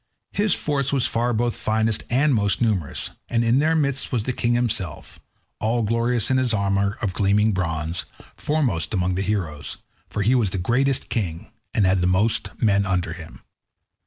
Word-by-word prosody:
His 205 Hz, -2 st, +2 dB
force 140 Hz, -2 st, -1 dB
was 135 Hz, -3 st, +2 dB
far 120 Hz, +1 st, 0 dB
both 120 Hz, 0 st, 0 dB
finest 110 Hz, 0 st, 0 dB
and 140 Hz, +4 st, +3 dB
most 100 Hz, -4 st, +1 dB
numerous, 100 Hz, -, -1 dB, 0.2 s
and 115 Hz, 0 st, +1 dB
in 115 Hz, +3 st, +3 dB
their 160 Hz, +2 st, +2 dB
midst 140 Hz, -3 st, -1 dB
was 120 Hz, -5 st, 0 dB
the 125 Hz, -, -2 dB
king 120 Hz, 0 st, 0 dB
himself, 115 Hz, -6 st, -3 dB, 0.4 s
all 115 Hz, +2 st, +1 dB
glorious 115 Hz, +2 st, +1 dB
in 130 Hz, -, +3 dB
his 125 Hz, -3 st, +1 dB
armour 100 Hz, +1 st, 0 dB
of 100 Hz, -4 st, 0 dB
gleaming 105 Hz, +3 st, +3 dB
bronze—foremost 85 Hz, -, -2 dB
among 90 Hz, -1 st, +1 dB
the 95 Hz, -, -1 dB
heroes, 90 Hz, -7 st, -3 dB, 0.3 s
for 105 Hz, -, -2 dB
he 115 Hz, +6 st, +3 dB
was 120 Hz, -6 st, +3 dB
the 95 Hz, -, -3 dB
greatest 125 Hz, +8 st, +1 dB
king, 95 Hz, -9 st, -3 dB, 0.2 s
and 105 Hz, -, +2 dB
had 95 Hz, -1 st, +2 dB
most 95 Hz, +5 st, +2 dB
men 100 Hz, -3 st, +3 dB
under 90 Hz, -4 st, -1 dB
him. 80 Hz, -1 st, -11 dB
110 Hz, 170 wpm, -23 LUFS, 95-120 Hz, 0.4 s, and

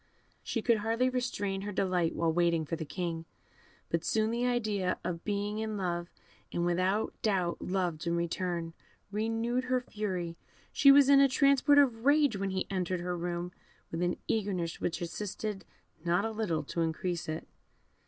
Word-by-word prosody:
She 230 Hz, -, -3 dB
could 235 Hz, -2 st, +4 dB
hardly 225 Hz, +4 st, +1 dB
restrain 205 Hz, -6 st, -2 dB
her 205 Hz, +1 st, -4 dB
delight 180 Hz, -4 st, 0 dB
while 165 Hz, -1 st, +1 dB
waiting 170 Hz, -2 st, +2 dB
for 165 Hz, -, -2 dB
the 160 Hz, -, -5 dB
King; 165 Hz, -1 st, -3 dB, 0.7 s
but 165 Hz, -1 st, 0 dB
soon 220 Hz, 0 st, +1 dB
the 240 Hz, +1 st, 0 dB
idea 215 Hz, -7 st, 0 dB
of 175 Hz, -, -2 dB
his -, -, -21 dB
being 205 Hz, +1 st, -2 dB
in 220 Hz, -1 st, -2 dB
love, 175 Hz, -2 st, -2 dB, 0.4 s
and 175 Hz, -, 0 dB
without 185 Hz, +5 st, +1 dB
doubt 185 Hz, -5 st, 0 dB
loved 175 Hz, -3 st, -1 dB
in 170 Hz, -, +1 dB
return, 170 Hz, -1 st, -2 dB, 0.4 s
renewed 225 Hz, +4 st, -1 dB
her 255 Hz, 0 st, +2 dB
fury; 185 Hz, -8 st, -4 dB, 0.4 s
she 275 Hz, -, +7 dB
was 280 Hz, -1 st, +7 dB
in 280 Hz, 0 st, +7 dB
a 275 Hz, 0 st, +6 dB
transport 280 Hz, +1 st, +4 dB
of 245 Hz, -6 st, +4 dB
rage 285 Hz, -3 st, +4 dB
when 195 Hz, 0 st, -2 dB
he 190 Hz, -1 st, -1 dB
entered 185 Hz, -2 st, -2 dB
her 180 Hz, 0 st, -2 dB
room 175 Hz, 0 st, -3 dB, 0.4 s
with 165 Hz, -, -3 dB
an 175 Hz, 0 st, 0 dB
eagerness 190 Hz, -6 st, -1 dB
which 170 Hz, -, -2 dB
assisted 200 Hz, +2 st, -4 dB, 0.4 s
not 175 Hz, +4 st, +2 dB
a 225 Hz, -, -1 dB
little 200 Hz, -9 st, -1 dB
to 165 Hz, +3 st, -3 dB
increase 165 Hz, +1 st, -2 dB
it. 155 Hz, +1 st, -4 dB
190 Hz, 175 wpm, -31 LUFS, 170-225 Hz, 0.7 s, she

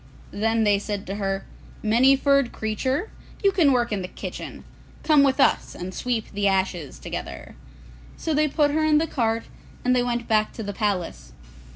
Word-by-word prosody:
Then 225 Hz, +2 st, +1 dB
they 205 Hz, -2 st, +3 dB
said 205 Hz, -1 st, -4 dB
to 195 Hz, -, -4 dB
her, 195 Hz, -1 st, -2 dB, 0.4 s
'Many 240 Hz, +5 st, +5 dB
furred 275 Hz, -2 st, +3 dB
Creature, 260 Hz, -, -2 dB, 0.3 s
you 395 Hz, -, +5 dB
can 340 Hz, -7 st, +4 dB
work 240 Hz, -2 st, +1 dB
in 205 Hz, -2 st, -1 dB
the 180 Hz, -, -4 dB
kitchen; -, -, -7 dB, 0.4 s
come 305 Hz, -3 st, +5 dB
with 275 Hz, 0 st, +3 dB
us -, -, +2 dB
and 180 Hz, +1 st, -6 dB
sweep 240 Hz, -1 st, -2 dB
the 200 Hz, 0 st, 0 dB
ashes 190 Hz, -6 st, -1 dB
together.' 65 Hz, 0 st, -7 dB, 0.6 s
So 320 Hz, -, -2 dB
they 305 Hz, +1 st, +3 dB
put 295 Hz, 0 st, +2 dB
her 310 Hz, +1 st, +1 dB
in 310 Hz, -1 st, +4 dB
the 315 Hz, -, +2 dB
cart 230 Hz, -6 st, -1 dB, 0.4 s
and 250 Hz, 0 st, +3 dB
they 250 Hz, -, +3 dB
went 240 Hz, -1 st, -2 dB
back 215 Hz, -1 st, +2 dB
to 225 Hz, -, -6 dB
the 205 Hz, 0 st, -4 dB
palace. 180 Hz, -, -2 dB
225 Hz, 185 wpm, -24 LUFS, 200-275 Hz, 0.6 s, Many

